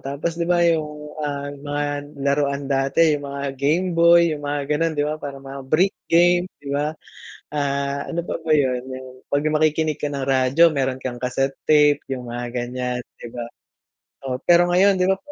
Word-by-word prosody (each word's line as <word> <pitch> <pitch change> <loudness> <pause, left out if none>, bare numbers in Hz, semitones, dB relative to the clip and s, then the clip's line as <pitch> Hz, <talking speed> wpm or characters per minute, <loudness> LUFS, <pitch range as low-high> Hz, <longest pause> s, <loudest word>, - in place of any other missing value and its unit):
tapos 140 +5 -3
'di 170 - -1
ba 175 -1 +3
yung 160 -3 +2 0.2
mga, 150 -1 -4
ah, 140 0 -4 0.2
mga 145 0 -1 0.4
laruan 140 0 +1
dati 135 +4 +3
yung 145 -1 -3
mga 140 0 -4
Gameboy, 170 +2 +4
yung 145 -1 -6
mga 145 0 -1
gano'n 165 +2 +1
'di 145 - +1
ba? 150 +1 -1
Parang 140 -1 -7
mga 135 0 -7
break 185 +5 +4 0.2
game 175 +1 +4
'di 140 - -11
ba, 150 +2 -1 0.6
ah, 140 0 -1
ano 170 - -2
pa - - -2
ba 160 - -1
yun 130 -5 +2
yung 130 0 -7 0.2
'pag 145 +1 +1
makikinig 155 0 +2
ka 150 -1 -4
ng 140 -1 -3
radyo 130 +6 +3
meron 130 -1 -1
kang 125 -2 -5
kaset 135 +2 -1
tape 150 -1 +4
yung 125 -2 -4
mga 120 +1 -4
ganyan, 125 0 -3 0.2
di 120 - -10
ba? 120 -1 -6 0.8
Oo. 125 - -2
pero 175 0 +5
ngayon, 195 +3 +5
'di 185 +1 +1
ba 190 - +1
145 Hz, 190 wpm, -22 LUFS, 135-165 Hz, 0.8 s, pero